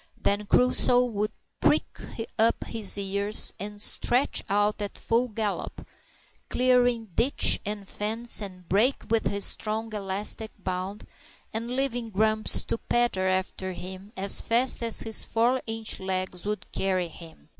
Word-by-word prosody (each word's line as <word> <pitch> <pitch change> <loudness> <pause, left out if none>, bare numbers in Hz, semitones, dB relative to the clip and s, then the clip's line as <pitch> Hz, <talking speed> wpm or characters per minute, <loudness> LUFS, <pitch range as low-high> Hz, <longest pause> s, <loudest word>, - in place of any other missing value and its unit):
Then 205 +1 -1
Crusoe 250 +1 +4
would 215 -3 -3 0.3
prick - - 0 0.4
up 225 +1 +2
his 220 -3 +2
ears 200 +1 +4
and 205 +2 -7
stretch 245 +5 +1
out 205 +1 0
at 205 - -5
full 235 +2 0
gallop, 215 -2 -5 0.6
clearing 245 -4 +1
ditch, 245 +10 +3
and 205 -1 -5
fence, 220 +4 +2
and 185 -3 -9
brake 225 +9 +1
with 225 -1 +1
his 200 0 0
strong 220 +1 -2
elastic 205 +2 -3
bound, 190 +1 -5 0.5
and 230 +2 -4
leaving 245 -2 -2
Grumps 215 +1 +3
to - - -4
patter 240 -6 0
after 185 0 -2
him 190 +3 -10
as 195 +1 +3
fast 240 +3 +1
as 230 -1 +6
his 225 -1 0
four 240 +3 0
inch 225 0 -3
legs 185 0 -4
would 210 0 -5
carry 185 -2 -1
him. 165 -1 -15
210 Hz, 140 wpm, -26 LUFS, 195-230 Hz, 0.6 s, as